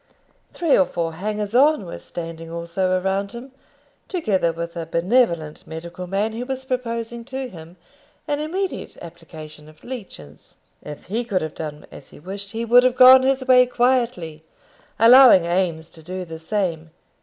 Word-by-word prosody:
Three 335 Hz, -4 st, +1 dB
or 280 Hz, -, +3 dB
four 165 Hz, -1 st, -3 dB
hangers 210 Hz, +4 st, -4 dB
on 275 Hz, -3 st, +4 dB
were 170 Hz, -, -8 dB
standing 165 Hz, -1 st, -8 dB
also 170 Hz, +3 st, -1 dB
around 195 Hz, +2 st, -2 dB
him, 245 Hz, +3 st, -9 dB, 0.6 s
together 205 Hz, -, 0 dB
with 170 Hz, +1 st, -6 dB
a 165 Hz, -1 st, -5 dB
benevolent 170 Hz, -3 st, 0 dB
medical 170 Hz, +3 st, -8 dB
man 200 Hz, +4 st, -1 dB
who 235 Hz, +2 st, -4 dB
was 265 Hz, 0 st, -5 dB
proposing 235 Hz, -2 st, -4 dB
to 265 Hz, 0 st, -5 dB
him 170 Hz, -4 st, -13 dB, 0.5 s
an 290 Hz, -1 st, -1 dB
immediate 365 Hz, +5 st, -4 dB
application 155 Hz, -2 st, -12 dB
of 155 Hz, -, -20 dB
leeches. 190 Hz, -, -10 dB, 0.2 s
If 150 Hz, -1 st, -10 dB
he 225 Hz, +6 st, -2 dB
could 195 Hz, -7 st, -2 dB
have 155 Hz, -, -5 dB
done 150 Hz, -2 st, -7 dB
as -, -, -13 dB
he -, -, -15 dB
wished, 195 Hz, +5 st, -7 dB
he 230 Hz, +1 st, -3 dB
would 240 Hz, +2 st, +6 dB
have 250 Hz, 0 st, +1 dB
gone 260 Hz, +1 st, +9 dB
his 265 Hz, 0 st, 0 dB
way 250 Hz, -1 st, +6 dB
quietly, 240 Hz, -11 st, 0 dB, 0.5 s
allowing 235 Hz, -5 st, +7 dB
Eames 170 Hz, -2 st, -1 dB
to 165 Hz, -, -14 dB
do 185 Hz, +3 st, -6 dB
the 160 Hz, -1 st, -9 dB
same. 165 Hz, -3 st, -3 dB
190 Hz, 165 wpm, -21 LUFS, 165-245 Hz, 0.6 s, gone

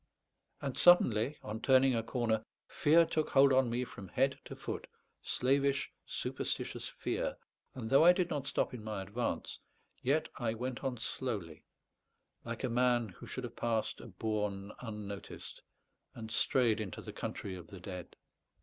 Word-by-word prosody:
And 135 Hz, -2 st, -3 dB
suddenly, 140 Hz, -6 st, +6 dB
on 110 Hz, +1 st, -5 dB
turning 130 Hz, 0 st, +5 dB
a 115 Hz, -, +1 dB
corner, 115 Hz, -2 st, 0 dB, 0.2 s
fear 165 Hz, +3 st, +5 dB
took 155 Hz, -1 st, 0 dB
hold 135 Hz, 0 st, +6 dB
on 130 Hz, -2 st, +4 dB
me 120 Hz, +2 st, 0 dB
from 100 Hz, -5 st, -10 dB
head 135 Hz, +7 st, +1 dB
to -, -, -7 dB
foot -, -, -5 dB, 0.3 s
slavish, 140 Hz, +2 st, +1 dB, 0.2 s
superstitious -, -, -3 dB
fear; -, -, -2 dB, 0.4 s
and 120 Hz, -4 st, -4 dB
though 135 Hz, +3 st, +7 dB
I 175 Hz, -, +10 dB
did 180 Hz, -1 st, +1 dB
not 140 Hz, -2 st, -2 dB
stop -, -, 0 dB
in 120 Hz, -4 st, -7 dB
my 105 Hz, -3 st, -3 dB
advance, 110 Hz, +5 st, -3 dB, 0.4 s
yet 145 Hz, +5 st, +2 dB
I 115 Hz, -2 st, -1 dB
went 125 Hz, +3 st, -4 dB
on 130 Hz, -2 st, -1 dB
slowly, 105 Hz, -9 st, -3 dB, 0.8 s
like -, -, -5 dB
a -, -, +2 dB
man 120 Hz, -1 st, +2 dB
who 90 Hz, -, -12 dB
should -, -, -5 dB
have -, -, -6 dB
passed 115 Hz, -2 st, -1 dB
a -, -, -9 dB
bourne 105 Hz, -1 st, -2 dB
unnoticed, 105 Hz, -4 st, -7 dB, 0.5 s
and 110 Hz, -1 st, -7 dB
strayed 115 Hz, -5 st, +3 dB
into 100 Hz, -4 st, -6 dB
the -, -, -7 dB
country 95 Hz, -, -4 dB
of 90 Hz, -3 st, -10 dB
the 95 Hz, -, -10 dB
dead. 90 Hz, -1 st, -7 dB
120 Hz, 160 wpm, -33 LUFS, 105-135 Hz, 0.8 s, I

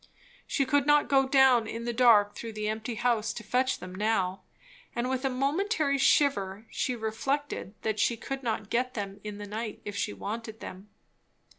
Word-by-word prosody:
She 275 Hz, -, +1 dB
could 285 Hz, +1 st, +2 dB
not 295 Hz, 0 st, +4 dB
go 270 Hz, -1 st, +4 dB
down 265 Hz, -4 st, +5 dB
in 230 Hz, +1 st, -5 dB
the 240 Hz, -, -1 dB
dark 225 Hz, -4 st, +5 dB
through 230 Hz, -1 st, -7 dB
the 215 Hz, 0 st, -3 dB
empty 220 Hz, +2 st, -3 dB
house 230 Hz, -1 st, +1 dB
to 220 Hz, -, -7 dB
fetch 255 Hz, +5 st, +1 dB
them 180 Hz, 0 st, -9 dB
now; 195 Hz, -2 st, 0 dB, 0.5 s
and 240 Hz, +1 st, -1 dB
with 260 Hz, 0 st, -1 dB
a -, -, +3 dB
momentary 280 Hz, +3 st, 0 dB
shiver 215 Hz, -8 st, +2 dB
she 250 Hz, -, -1 dB
reflected 225 Hz, 0 st, -3 dB
that 215 Hz, -1 st, -1 dB
she 235 Hz, -, +2 dB
could 270 Hz, +4 st, -5 dB
not 220 Hz, -4 st, -3 dB
get 250 Hz, +2 st, 0 dB
them 200 Hz, -2 st, -5 dB
in 210 Hz, -1 st, -6 dB
the 205 Hz, -, -6 dB
night 215 Hz, +1 st, -5 dB
if 205 Hz, -, -5 dB
she -, -, -1 dB
wanted 220 Hz, -, -6 dB
them. 190 Hz, +3 st, -9 dB
230 Hz, 185 wpm, -29 LUFS, 210-265 Hz, 0.5 s, down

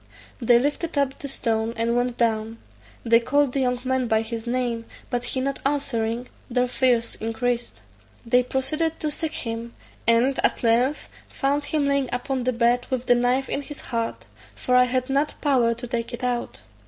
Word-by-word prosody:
They 235 Hz, 0 st, +6 dB
lifted 290 Hz, +5 st, -1 dB
up 275 Hz, -1 st, +1 dB
the 280 Hz, -, -5 dB
stone, 230 Hz, -3 st, -1 dB
and 230 Hz, +1 st, +1 dB
went 245 Hz, 0 st, 0 dB
down; 225 Hz, -1 st, 0 dB, 0.5 s
they 230 Hz, 0 st, +5 dB
called 275 Hz, +2 st, +2 dB
the 275 Hz, -, 0 dB
young 250 Hz, -1 st, +1 dB
man 260 Hz, -1 st, 0 dB
by 220 Hz, 0 st, +2 dB
his 225 Hz, +1 st, -6 dB
name, 240 Hz, -2 st, -1 dB, 0.3 s
but 245 Hz, -1 st, -1 dB
he 260 Hz, -, -1 dB
not 275 Hz, +1 st, -2 dB
answering, 245 Hz, -4 st, -1 dB, 0.2 s
their 250 Hz, 0 st, +1 dB
fears 245 Hz, -2 st, +1 dB
increased. 240 Hz, +2 st, -2 dB, 0.4 s
They 245 Hz, +2 st, +4 dB
proceeded 300 Hz, +6 st, -1 dB
to 305 Hz, -, -1 dB
seek 315 Hz, +1 st, -2 dB
him; 230 Hz, 0 st, -4 dB, 0.3 s
and 235 Hz, +4 st, +4 dB
at -, -, +2 dB
length 245 Hz, +5 st, +2 dB, 0.2 s
found 285 Hz, +1 st, 0 dB
him 295 Hz, -2 st, 0 dB
lying 280 Hz, -2 st, +1 dB
upon 250 Hz, 0 st, -2 dB
the 255 Hz, -, +1 dB
bed 240 Hz, +1 st, +2 dB
with 255 Hz, -1 st, -2 dB
the 245 Hz, -, +5 dB
knife 250 Hz, +2 st, +1 dB
in 280 Hz, -, -2 dB
his 290 Hz, +1 st, -9 dB
heart, 230 Hz, -2 st, -3 dB, 0.3 s
for 250 Hz, -, 0 dB
I 250 Hz, 0 st, +7 dB
had 255 Hz, 0 st, -1 dB
not 280 Hz, +2 st, 0 dB
power 250 Hz, -5 st, +2 dB
to 235 Hz, -, -6 dB
take 235 Hz, 0 st, -3 dB
it 240 Hz, -, -11 dB
out. 245 Hz, -1 st, -2 dB
250 Hz, 185 wpm, -24 LUFS, 235-270 Hz, 0.5 s, I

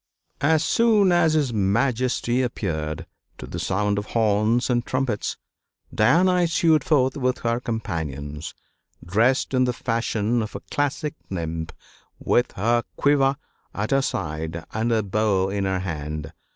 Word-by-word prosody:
As 155 Hz, +2 st, +3 dB
soon 215 Hz, -2 st, +4 dB
as 175 Hz, -2 st, +4 dB
his 140 Hz, -6 st, +1 dB
Majesty 120 Hz, +4 st, +1 dB
approached, 85 Hz, -9 st, -3 dB, 0.3 s
to -, -, -8 dB
the -, -, -6 dB
sound 105 Hz, +1 st, 0 dB
of 105 Hz, -, -7 dB
horns 110 Hz, +2 st, +2 dB
and 120 Hz, -2 st, +1 dB
trumpets 130 Hz, -5 st, -2 dB, 0.6 s
Diana 180 Hz, +11 st, +4 dB
issued 165 Hz, -3 st, +3 dB
forth 130 Hz, -4 st, +2 dB
with 130 Hz, -2 st, 0 dB
her 115 Hz, 0 st, 0 dB
companions, 75 Hz, -, -4 dB, 0.5 s
dressed 115 Hz, +10 st, +2 dB
in 130 Hz, 0 st, +3 dB
the 125 Hz, -, 0 dB
fashion 115 Hz, -1 st, -1 dB
of 110 Hz, -, -5 dB
a -, -, -5 dB
classic 145 Hz, +1 st, -1 dB, 0.2 s
nymph 80 Hz, -3 st, -4 dB, 0.5 s
with 120 Hz, -, +1 dB
her 120 Hz, +5 st, +1 dB
quiver 140 Hz, -1 st, +3 dB, 0.4 s
at 105 Hz, +2 st, -2 dB
her 135 Hz, 0 st, +4 dB
side 80 Hz, -, -3 dB
and 110 Hz, +2 st, 0 dB
her 110 Hz, -2 st, +2 dB
bow 100 Hz, -1 st, +1 dB
in 100 Hz, 0 st, -1 dB
her 95 Hz, -1 st, -1 dB
hand. 75 Hz, -4 st, -5 dB
115 Hz, 140 wpm, -24 LUFS, 95-135 Hz, 0.6 s, soon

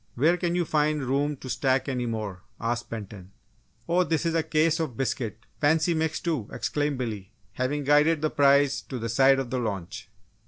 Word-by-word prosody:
"Where 155 Hz, +8 st, +3 dB
can 175 Hz, -1 st, -1 dB
you 175 Hz, -1 st, +1 dB
find 150 Hz, -1 st, +1 dB
room 140 Hz, +3 st, 0 dB
to 130 Hz, -, -10 dB
stack 130 Hz, +1 st, +1 dB
any 125 Hz, -3 st, -2 dB
more?" 105 Hz, -5 st, -4 dB, 0.2 s
asked 115 Hz, +1 st, -2 dB
Benton. 100 Hz, -4 st, -8 dB, 0.5 s
"Oh, 180 Hz, +2 st, +3 dB
this 165 Hz, -2 st, -1 dB
is 165 Hz, -, +1 dB
a 165 Hz, -, +2 dB
case 160 Hz, +1 st, +1 dB
of 150 Hz, -8 st, -3 dB
biscuits 115 Hz, -4 st, -3 dB
fancy 160 Hz, +3 st, +3 dB
mixed, 160 Hz, -1 st, -1 dB
too!" 155 Hz, -11 st, -2 dB
exclaimed 145 Hz, -2 st, -1 dB
Billy, 105 Hz, -6 st, -5 dB, 0.2 s
having 130 Hz, +6 st, -2 dB
guided 150 Hz, +2 st, +3 dB
the 155 Hz, -, +1 dB
prize 140 Hz, 0 st, +4 dB
to 130 Hz, -, -7 dB
the 115 Hz, -1 st, -4 dB
side 135 Hz, +4 st, +5 dB
of 135 Hz, -3 st, -3 dB
the 130 Hz, -, 0 dB
launch. 100 Hz, -4 st, -5 dB
140 Hz, 190 wpm, -26 LUFS, 115-155 Hz, 0.5 s, side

